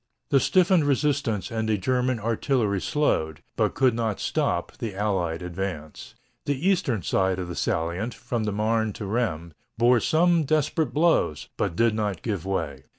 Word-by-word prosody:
The 140 - +5
stiffened 180 +3 +3
resistance 135 - 0
and 110 -1 -2
the 105 - +2
German 125 +4 0
artillery 110 -2 0
slowed, 80 - 0
but - - 0
could 130 -3 +3
not 115 -3 -2
stop, - - -1
the 110 -4 -4
Allied 90 -5 -1
advance. 85 -4 -6 0.3
The 145 +5 -1
eastern 165 - +1
side 95 +1 +1
of 90 -1 -4
the 85 - -6
salient, 85 +8 -2
from 120 -1 -3
the 105 - -1
Marne 110 +1 0
to 105 - -6
Rheims, 95 -7 -2 0.2
bore 120 +1 +5
some 170 +5 +3
desperate 155 -1 0
blows, 145 - +1
but 85 - -1
did 115 +3 +3
not 105 -5 -2
give 100 -6 -3
way. 75 -8 -3
110 Hz, 160 wpm, -25 LUFS, 95-130 Hz, 0.3 s, The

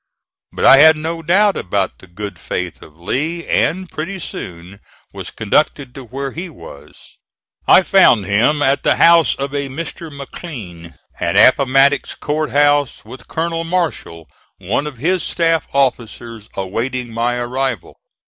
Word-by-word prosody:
But - - -2
I - - +9
had 160 +2 +7
no 165 +2 -4
doubt 195 +5 +3
about 95 +1 -2
the 95 - -16
good 100 +1 -8
faith 90 -2 -5
of 80 0 -15
Lee, 155 - -3
and 185 +3 0
pretty 180 +5 -5
soon 90 - -8 0.3
was - - -7
conducted 130 +4 0
to 135 - -9
where 135 +3 -5
he 175 +5 -6
was. 95 - -15 0.5
I 190 - +7
found 170 - +4
him 120 +10 +2
at 135 +1 +2
the - - +2
house 170 -2 +5
of 140 +1 -5
a 140 -1 -3
Mr. 160 +3 -7
McLean, 120 - -9 0.2
at 85 -1 -1
Appomattox 135 +1 +4
Court 150 0 -2
House, 145 -1 +1
with 125 +4 -12
Colonel 165 0 -2
Marshall, 165 - -3 0.3
one 150 - -2
of 145 -4 -8
his 175 +8 0
staff 165 -1 0
officers, 120 -4 -2
awaiting 115 +5 -3
my 120 +2 0
arrival. 125 -2 -3
135 Hz, 150 wpm, -17 LUFS, 110-160 Hz, 0.5 s, I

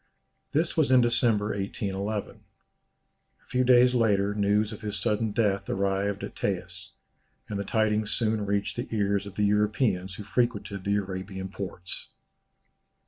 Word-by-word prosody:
This 160 +3 +1
was 155 -5 +3
in 130 -1 +6
December, 115 -3 +2
1811. 100 +1 -3
A - - -39
few 125 0 +1
days 125 0 +6
later 105 -4 +2
news 105 +1 +2
of - - -8
his 105 -1 -3
sudden 110 +1 0
death 100 -2 0
arrived 100 +1 0
at - - -6
Taes, - - -3 0.6
and 100 -2 -4
the - - -1
tidings 110 0 +1
soon 110 -2 0
reached 100 +2 -1
the 120 - -3
ears 100 -2 0
of 100 - -10
the 105 - +2
Europeans 105 -2 +1
who 105 - -7
frequented 105 -4 -1
the 100 0 +2
Arabian 95 -1 -4
ports. 90 -3 -6
105 Hz, 145 wpm, -27 LUFS, 100-110 Hz, 0.6 s, in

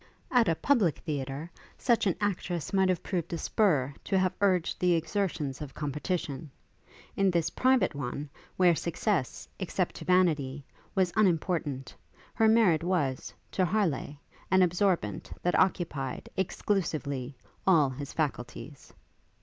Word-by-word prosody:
At 245 -3 +4
a 165 - +2
public 215 - +2
theatre, 145 +1 -4 0.3
such 235 -4 +2
an 185 - +2
actress 180 -5 -2
might 190 -1 +3
have 180 -3 0
proved 175 -5 -3
a - - -1
spur 150 -8 +1
to 195 - +1
have 185 -1 +2
urged 185 -4 +2
the 180 -1 +3
exertions 165 -5 -1
of 145 -3 -7
competition; 150 0 -3 0.7
in 195 -1 +3
this 170 -3 +1
private 260 -5 +3
one, 140 +1 -4 0.3
where 180 -2 +5
success, 170 - -1
except - - -1
to - - -8
vanity, 150 -7 +2 0.3
was 185 -3 +2
unimportant, 165 -8 0 0.4
her 225 - +3
merit 210 -8 +4
was, 155 -8 -1 0.2
to 185 - +1
Harleigh, 170 -7 0 0.3
an 190 0 +5
absorbent 175 - 0
that 175 - +2
occupied, 160 -8 -1
exclusively, 150 -9 -2 0.3
all 155 -8 +5
his 140 +2 -6
faculties. 145 -1 -4
170 Hz, 135 wpm, -29 LUFS, 145-190 Hz, 0.7 s, where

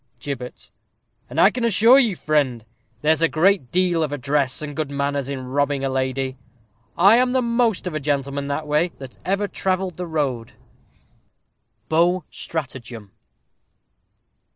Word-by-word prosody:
Gibbet. 125 -1 -7 0.6
And 135 +6 -3
I 195 - +6
can 245 +1 -4
assure 230 +4 +6
you, 230 -8 +2
friend, 140 -8 0 0.4
there's 155 +1 +3
a 165 - +5
great 170 -4 +2
deal 180 -2 +2
of 155 -2 -1
address, 140 0 -1
and 145 -1 -6
good 155 -3 -2
manners, 140 -1 -2
in 130 -2 -5
robbing 140 +1 0
a - - 0
lady. 130 0 -2 0.6
I 200 +6 +6
am 250 0 +2
the 260 - +2
most 235 -4 +1
of 180 - -3
a 155 - -2
gentleman, 140 -1 -2
that 145 +2 -3
way, 150 +4 +1
that 135 -2 -11
ever 200 +2 0
travelled 185 -3 -2
the 180 -1 -4
road. 135 -8 -2 1.3
_Beaux 175 +3 +2
Stratagem. 120 - -6
150 Hz, 150 wpm, -22 LUFS, 135-185 Hz, 1.3 s, I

